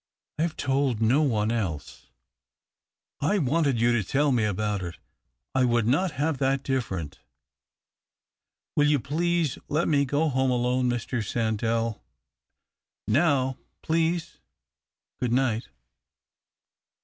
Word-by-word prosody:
I - - +2
have 165 -1 -1
told 135 -4 0
no 115 +7 +3
one 110 -7 +1
else." 95 -11 -4 0.6
" - - -47
I 205 - +3
wanted 145 - +1
you 120 +1 +3
to 120 -3 +1
tell 140 +8 +1
me 120 -4 +2
about 105 0 -1
it 85 -2 -6 0.3
— - - -54
I 130 - +3
would 120 -2 +2
not 155 +8 +1
have 145 +1 -1
that 135 0 +1
different. 95 - -3 1.6
Will 150 0 +4
you 145 -1 +3
please 165 +2 0
let 155 +4 0
me 140 -2 +3
go 145 +4 +1
home 130 -1 +1
alone, 125 0 +1
Mr. 120 0 -2
Sandell? 115 +1 -1 1.1
Now, 130 +1 +2 0.2
please, 165 +1 0 0.8
o;ood 120 -2 0
nio; 120 -4 +2
ht." - - -14
130 Hz, 130 wpm, -26 LUFS, 115-145 Hz, 1.6 s, Will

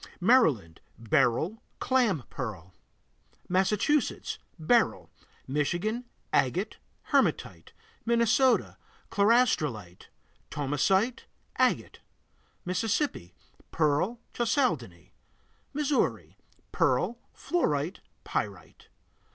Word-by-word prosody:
Maryland 160 - +3 0.2
Beryl, 135 - +1 0.2
clam 235 - +1
pearl. 95 - -6 0.7
Massachusetts 210 +10 0 0.2
Beryl. 225 +9 +1 0.3
Michigan 175 - -1 0.3
Agate, - - +1 0.3
hematite. - - 0 0.3
Minnesota 235 +2 +2 0.3
Chlorastrolite, 155 - +1 0.4
thomsonite, 170 - 0 0.3
agate. - - +1 0.7
Mississippi 185 - -1 0.3
Pearl, 160 +9 +1
chalcedony. 170 - -1 0.6
Missouri 295 -1 -1 0.4
Pearl, 240 +1 +1 0.2
fluorite, 170 - -1 0.2
pyrite. - - -5
185 Hz, 60 wpm, -28 LUFS, -, 0.7 s, Maryland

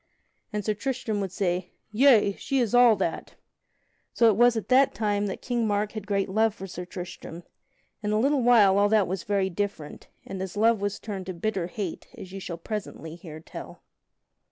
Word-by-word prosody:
And 210 -2 -3
Sir 215 - +1
Tristram 220 -2 -3
would 190 -2 -3
say, 180 -2 -2 0.2
"Yea, 220 -3 +5
she 275 +7 -3
is 240 -4 +1
all 245 -2 +7
that." 185 -4 -3 0.8
So 230 -1 +5
it - - -1
was 240 +1 +4
at 215 - -4
that 265 +1 +4
time 205 -2 0
that 195 - -6
King 240 -3 0
Mark 205 0 0
had 215 -2 -7
great 200 -1 0
love 220 +2 +1
for 195 - -8
Sir 180 -1 -7
Tristram; 175 -1 -8 0.6
in 210 -1 -2
a 215 - +2
little 275 +3 +2
while 215 -5 +5
all 205 0 +4
that 215 -3 +3
was 185 0 -3
very 195 -1 0
different, 200 -5 -5 0.2
and 190 -1 -6
his 190 +1 -5
love 225 0 +3
was 205 0 -2
turned 195 -4 -6
to 185 - -5
bitter 190 -1 -2
hate, 190 -1 -5
as 185 - -9
you 195 - -6
shall 175 -3 -6
presently 170 -4 -6
hear 160 -3 -10
tell. - - -10
205 Hz, 200 wpm, -26 LUFS, 190-220 Hz, 0.8 s, all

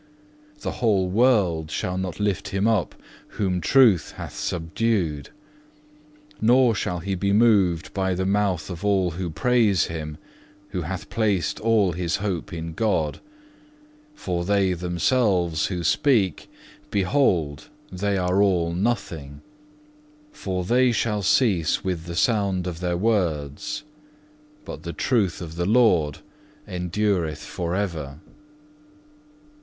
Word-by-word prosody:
The - - -3
whole 100 -6 +2
world 95 -9 +2
shall 90 +4 -2
not 95 0 -4
lift 100 0 -1
him 95 +2 0
up 110 -6 +1 0.4
whom 90 -3 0
Truth 115 - +4
hath - - -8
subdued; 85 -3 -1 1.1
nor 120 +1 +5
shall 90 -4 -2
he 95 +3 -3
be 100 +2 0
moved 100 -6 +3
by 95 -1 0
the 95 +1 -1
mouth 95 -5 0
of 90 +1 -7
all 95 -3 +2
who 90 +1 -4
praise 105 +1 +2
him, 75 -2 -5 0.5
who 95 -2 -3
hath 95 +4 -6
placed 105 -6 0
all 110 -4 +2
his 85 0 -1
hope 100 -1 -3
in 85 -2 -5
God. 90 -7 0 1.0
For 90 - -3
they 100 0 +2
themselves 90 - +1
who 90 -3 -3
speak, 100 - +1 0.4
behold, 90 - +1 0.2
they 100 +2 -1
are 90 +1 +1
all 90 -4 +2
nothing; 85 -8 -3 0.9
for 95 - -4
they 125 +4 +3
shall 110 -2 0
cease 95 - +2
with 90 -3 -3
the 85 -1 -6
sound 100 -4 +1
of 85 -2 -5
their 90 -1 -1
words, 95 - -1 0.8
but - - -7
the 85 -1 -6
truth 100 - 0
of 80 -1 -8
the 85 +1 -1
Lord 100 - +3 0.5
endureth 90 -3 -1
for 85 0 -3
ever. 80 -8 -3
95 Hz, 125 wpm, -24 LUFS, 85-105 Hz, 1.1 s, nor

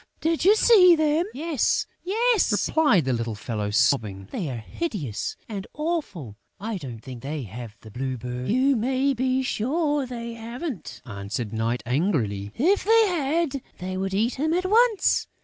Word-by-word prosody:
Did 325 0 0
you 400 +4 +6
see 385 -6 +7
them?" 315 +3 +1
"Yes, 315 - 0 0.2
yes!" 450 +4 +2
replied 285 - +3
the 130 - +1
little 115 -2 -2
fellow, 105 -1 -3
sobbing. 105 -3 +1
"They 170 -7 -3
are 125 - -4
hideous 140 - -4
and 200 -3 -6
awful.... 285 - -3 0.2
I 215 +1 -3
don't 120 -7 -8
think 125 -2 -9
they 145 +1 -4
have 110 +1 -9
the 110 - -12
Blue 130 +3 -3
Bird...." 125 +2 -5
"You 265 +4 +3
may 260 +4 +1
be 260 +1 0
sure 290 +4 0
they 235 -1 -6
haven't," 230 - -6
answered 105 0 -5
Night, 115 +1 -1
angrily. 120 - 0
"If 370 +10 +2
they 450 +1 +5
had, 305 -3 0 0.2
they 185 +1 -5
would 190 0 -2
eat 230 +6 0
him 315 +3 +1
at 365 +1 0
once.... 445 +1 +3
225 Hz, 165 wpm, -25 LUFS, -, 0.2 s, see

